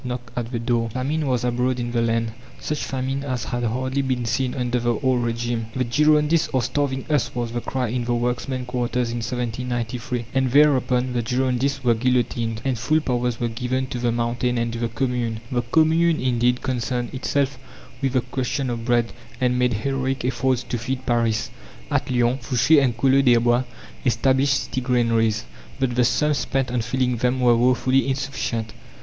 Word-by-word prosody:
Want 125 Hz, -, -5 dB, 0.2 s
knocked 115 Hz, -, -18 dB
at 120 Hz, -1 st, -3 dB
the 120 Hz, -, -2 dB
door. 115 Hz, 0 st, 0 dB
Famine 140 Hz, +6 st, -2 dB
was 125 Hz, -2 st, 0 dB
abroad 125 Hz, +1 st, 0 dB
in 120 Hz, 0 st, -3 dB
the 120 Hz, -1 st, +1 dB
land 115 Hz, 0 st, 0 dB, 0.3 s
such 150 Hz, -, -3 dB
famine 135 Hz, +1 st, -2 dB
as 130 Hz, -4 st, -2 dB
had 120 Hz, +2 st, -3 dB
hardly 130 Hz, +4 st, -1 dB
been 130 Hz, -3 st, -1 dB
seen 125 Hz, +3 st, -1 dB
under 125 Hz, -1 st, 0 dB
the 120 Hz, 0 st, +1 dB
old 130 Hz, 0 st, +1 dB
regime. 115 Hz, -1 st, -2 dB
"The 130 Hz, -, +1 dB
Girondists 150 Hz, +5 st, +3 dB
are 130 Hz, -, +2 dB
starving 135 Hz, 0 st, -1 dB
us!" 145 Hz, -6 st, 0 dB
was 120 Hz, -2 st, -2 dB
the 120 Hz, 0 st, -3 dB
cry 125 Hz, -2 st, -2 dB
in 120 Hz, +1 st, -2 dB
the 120 Hz, 0 st, 0 dB
workmen's 125 Hz, +2 st, -2 dB
quarters 125 Hz, -1 st, -1 dB
in 120 Hz, -, -3 dB
1793, 120 Hz, 0 st, -3 dB
and 135 Hz, -1 st, +2 dB
thereupon 130 Hz, -3 st, +3 dB
the 120 Hz, -, 0 dB
Girondists 130 Hz, +3 st, 0 dB
were 120 Hz, -2 st, +4 dB
guillotined, 115 Hz, -2 st, 0 dB
and 130 Hz, -4 st, 0 dB
full 155 Hz, +7 st, +2 dB
powers 125 Hz, -4 st, -1 dB
were 120 Hz, -, 0 dB
given 125 Hz, +3 st, -2 dB
to 125 Hz, -, -4 dB
"the 120 Hz, -1 st, +1 dB
Mountain" 120 Hz, +1 st, -1 dB
and 115 Hz, 0 st, -1 dB
to 115 Hz, -, -4 dB
the 115 Hz, -, 0 dB
Commune. 120 Hz, -1 st, -2 dB
The 120 Hz, -1 st, +1 dB
Commune 160 Hz, +6 st, +3 dB
indeed 125 Hz, -1 st, +1 dB
concerned 125 Hz, -1 st, -2 dB
itself 135 Hz, 0 st, -1 dB, 0.4 s
with 135 Hz, -2 st, 0 dB
the 130 Hz, -, +3 dB
question 130 Hz, +1 st, -2 dB
of 115 Hz, -1 st, -4 dB
bread, 120 Hz, -2 st, +1 dB, 0.3 s
and 125 Hz, -1 st, +1 dB
made 125 Hz, -1 st, +2 dB
heroic 135 Hz, -2 st, -1 dB
efforts 130 Hz, 0 st, 0 dB
to 120 Hz, -, -4 dB
feed 130 Hz, +3 st, -4 dB
Paris. 115 Hz, -3 st, +1 dB, 0.4 s
At -, -, 0 dB
Lyons, 125 Hz, 0 st, +1 dB
Fouché 140 Hz, +5 st, +4 dB
and 120 Hz, -3 st, 0 dB
Collot 135 Hz, +1 st, +4 dB
d'Herbois 120 Hz, 0 st, +4 dB, 0.4 s
established 130 Hz, +2 st, +2 dB
city 130 Hz, +1 st, -3 dB
granaries, 115 Hz, -, +1 dB, 0.3 s
but 130 Hz, -2 st, 0 dB
the 125 Hz, +1 st, +3 dB
sums 150 Hz, +3 st, +2 dB
spent 125 Hz, +2 st, -1 dB
on 125 Hz, -1 st, 0 dB
filling 125 Hz, +1 st, 0 dB
them 125 Hz, +2 st, +1 dB
were 120 Hz, -2 st, +5 dB
woefully 130 Hz, +2 st, +2 dB
insufficient. 130 Hz, -5 st, -2 dB
125 Hz, 185 wpm, -23 LUFS, 120-130 Hz, 0.4 s, were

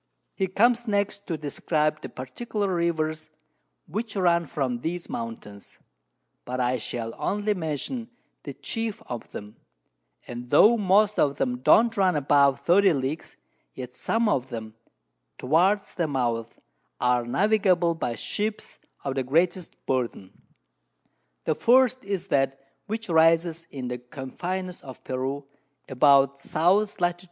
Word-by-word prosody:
_] -, -, -51 dB, 0.3 s
He 190 Hz, -, -1 dB
comes 235 Hz, +5 st, +2 dB
next 200 Hz, -1 st, -1 dB
to 165 Hz, -, -2 dB
describe 150 Hz, +1 st, -1 dB
the -, -, -7 dB
particular 200 Hz, -, -3 dB
Rivers 160 Hz, -2 st, -1 dB, 0.6 s
which 210 Hz, +6 st, -5 dB
run 170 Hz, -3 st, +2 dB
from 130 Hz, -5 st, -2 dB
these 170 Hz, +6 st, -4 dB
Mountains; 105 Hz, -3 st, -7 dB, 0.7 s
but 125 Hz, +1 st, -4 dB
I 125 Hz, 0 st, +1 dB
shall 115 Hz, 0 st, -4 dB
only 210 Hz, +1 st, 0 dB
mention 185 Hz, -, -4 dB, 0.3 s
the -, -, -8 dB
chief 225 Hz, -2 st, -4 dB
of 120 Hz, -2 st, -7 dB
them; 105 Hz, +2 st, -9 dB, 0.7 s
and 120 Hz, 0 st, -8 dB
tho' 210 Hz, -, +7 dB
most 210 Hz, 0 st, +3 dB
of 140 Hz, -1 st, +2 dB
them 125 Hz, -1 st, -1 dB
don't 225 Hz, -, +5 dB
run 190 Hz, -4 st, +3 dB
above 140 Hz, -1 st, +3 dB
30 190 Hz, +1 st, +5 dB
Leagues, 140 Hz, +3 st, -4 dB, 0.4 s
yet 125 Hz, -1 st, -7 dB
some 225 Hz, -, 0 dB
of 130 Hz, -10 st, 0 dB
them, 110 Hz, -3 st, -6 dB, 0.6 s
towards 180 Hz, +10 st, +2 dB
their 170 Hz, -3 st, -1 dB
Mouths, 120 Hz, -5 st, -2 dB, 0.4 s
are 125 Hz, -1 st, +2 dB
navigable 180 Hz, -, +2 dB
by 125 Hz, -8 st, -3 dB
Ships 205 Hz, -, -4 dB, 0.2 s
of 135 Hz, -, -2 dB
the 135 Hz, -1 st, -1 dB
greatest 170 Hz, +6 st, 0 dB
Burthen. 120 Hz, -7 st, -2 dB, 1.1 s
The -, -, +1 dB
first 255 Hz, +1 st, +3 dB
is 195 Hz, -2 st, -4 dB
that 135 Hz, 0 st, +1 dB, 0.3 s
which 220 Hz, +1 st, -4 dB
rises 165 Hz, 0 st, +3 dB
in 130 Hz, -3 st, -6 dB
the 125 Hz, 0 st, -4 dB
Confines 175 Hz, +9 st, -5 dB
of 130 Hz, -2 st, -11 dB
Peru, 135 Hz, +2 st, -3 dB, 0.4 s
about 140 Hz, +1 st, +4 dB
S. 195 Hz, +6 st, +2 dB
Lat. 175 Hz, 0 st, +1 dB
160 Hz, 135 wpm, -26 LUFS, 130-195 Hz, 1.1 s, tho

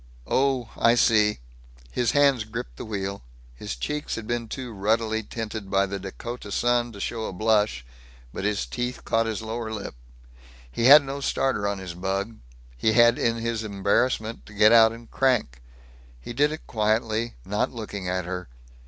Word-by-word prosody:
"Oh, 130 Hz, -4 st, +1 dB
I 115 Hz, +1 st, +4 dB
see." 105 Hz, -, +3 dB, 0.5 s
His 120 Hz, -2 st, 0 dB
hands 140 Hz, -5 st, +4 dB
gripped 110 Hz, -, -7 dB
the -, -, -6 dB
wheel. 100 Hz, -2 st, -4 dB, 0.3 s
His -, -, -6 dB
cheeks 150 Hz, -, -3 dB
had 115 Hz, -, -6 dB
been 120 Hz, 0 st, -2 dB
too 125 Hz, 0 st, -6 dB
ruddily 110 Hz, +2 st, 0 dB
tinted 110 Hz, -2 st, -6 dB
by 100 Hz, 0 st, +3 dB
the 100 Hz, 0 st, -5 dB
Dakota 105 Hz, +3 st, -7 dB
sun 120 Hz, +2 st, +1 dB
to 100 Hz, -, -10 dB
show 110 Hz, +2 st, -3 dB
a -, -, -5 dB
blush, 105 Hz, -, +1 dB, 0.5 s
but -, -, -5 dB
his 105 Hz, 0 st, 0 dB
teeth 125 Hz, 0 st, -4 dB
caught 115 Hz, 0 st, +1 dB
his 110 Hz, -1 st, -3 dB
lower 110 Hz, 0 st, -4 dB
lip. 105 Hz, -2 st, -5 dB, 0.8 s
He 115 Hz, -, -1 dB
had 145 Hz, +3 st, +10 dB
no 140 Hz, +1 st, -5 dB
starter 130 Hz, -6 st, 0 dB
on 100 Hz, 0 st, -1 dB
his 95 Hz, -3 st, -7 dB
bug; 95 Hz, +5 st, -3 dB, 0.4 s
he 110 Hz, -, +1 dB
had 120 Hz, 0 st, +5 dB
in 115 Hz, 0 st, +1 dB
his 115 Hz, -1 st, -2 dB
embarrassment 110 Hz, +3 st, 0 dB
to 105 Hz, -, -13 dB
get 105 Hz, +1 st, +6 dB
out 110 Hz, -1 st, +7 dB
and 115 Hz, 0 st, -12 dB
crank. 120 Hz, -, +1 dB, 0.6 s
He 90 Hz, -, -8 dB
did 145 Hz, +5 st, +2 dB
it 155 Hz, -, -7 dB
quietly, 110 Hz, +1 st, 0 dB
not 105 Hz, +2 st, -1 dB
looking 105 Hz, -5 st, -5 dB
at 90 Hz, -1 st, -1 dB
her. 90 Hz, -4 st, -5 dB
110 Hz, 175 wpm, -25 LUFS, 100-120 Hz, 0.8 s, had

